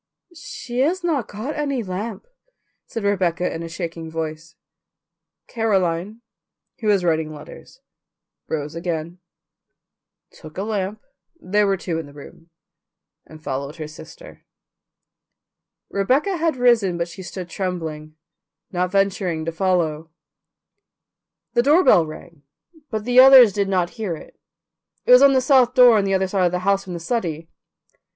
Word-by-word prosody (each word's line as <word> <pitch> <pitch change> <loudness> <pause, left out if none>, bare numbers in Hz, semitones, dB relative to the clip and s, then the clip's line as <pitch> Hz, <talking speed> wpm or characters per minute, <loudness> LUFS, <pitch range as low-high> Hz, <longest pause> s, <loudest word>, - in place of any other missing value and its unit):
"She 315 - -7
has 345 +7 +1
not 305 -9 -1
got 220 +9 -5
any 280 -5 -2
lamp," 195 +2 -5 0.6
said 225 - -5
Rebecca 180 -4 0
in 165 - -5
a 165 - -6
shaking 165 -1 -6
voice. 160 0 -6 0.9
Caroline, 200 -2 -1 0.6
who 220 - -4
was 200 -3 +3
writing 160 -2 0
letters, 155 - -13 0.7
rose 150 -1 -4
again, 170 0 -4 1.1
took 155 +1 -14
a 195 - -2
lamp 210 -1 -3 0.4
(there 205 +3 +1
were 195 -1 +1
two 170 -3 -3
in 160 - -7
the 145 - -15
room) 155 +3 -14 0.8
and 155 0 -14
followed 140 +2 -4
her 155 -2 -6
sister. 470 - -13 1.5
Rebecca 270 - +1
had 325 -2 0
risen, 230 -8 +3
but 170 0 -2
she 175 +3 -10
stood 180 0 -7
trembling, 160 -5 -5 0.6
not 180 0 -1
venturing 190 -4 0
to 165 - -2
follow. 165 -3 -1 1.4
The 240 - +3
doorbell 275 - +4
rang, 155 0 -12 0.5
but 215 -2 -3
the 245 +1 +4
others 260 -5 +9
did 200 -1 -1
not 180 -2 0
hear 185 -6 -2
it; - - -15 0.7
it - - +2
was 250 +1 +9
on 280 -1 +7
the 260 - +3
south 255 -2 +3
door 250 -3 +7
on 200 - 0
the 195 0 +1
other 190 0 +1
side 185 -1 +1
of - - -2
the 180 - -1
house 195 0 +1
from 185 - -7
the 170 - -5
study. 165 -5 -3
185 Hz, 145 wpm, -21 LUFS, 165-230 Hz, 1.5 s, others